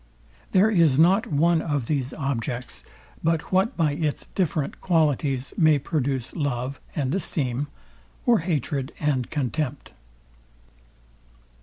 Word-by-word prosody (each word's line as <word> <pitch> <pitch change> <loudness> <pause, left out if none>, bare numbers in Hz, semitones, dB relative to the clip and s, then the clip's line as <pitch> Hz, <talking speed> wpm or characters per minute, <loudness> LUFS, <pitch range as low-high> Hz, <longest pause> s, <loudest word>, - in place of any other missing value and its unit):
There 200 +4 +4
is 165 -9 +4
not 185 +7 +4
one 160 +2 +3
of 145 -6 -1
these 135 -1 -1
objects, 125 -3 -3 0.4
but 165 -1 0
what 190 +4 +2
by 160 -3 +2
its 150 0 -2
different 160 -6 -1
qualities 145 -6 +1
may 155 -3 +5
produce 135 -3 -2
love 140 -3 -2 0.2
and 140 -2 -1
esteem, 145 -7 -1 0.6
or 240 -2 +5
hatred 145 -4 -2
and 140 -5 0
contempt. 145 0 -3
150 Hz, 115 wpm, -25 LUFS, 135-165 Hz, 0.6 s, may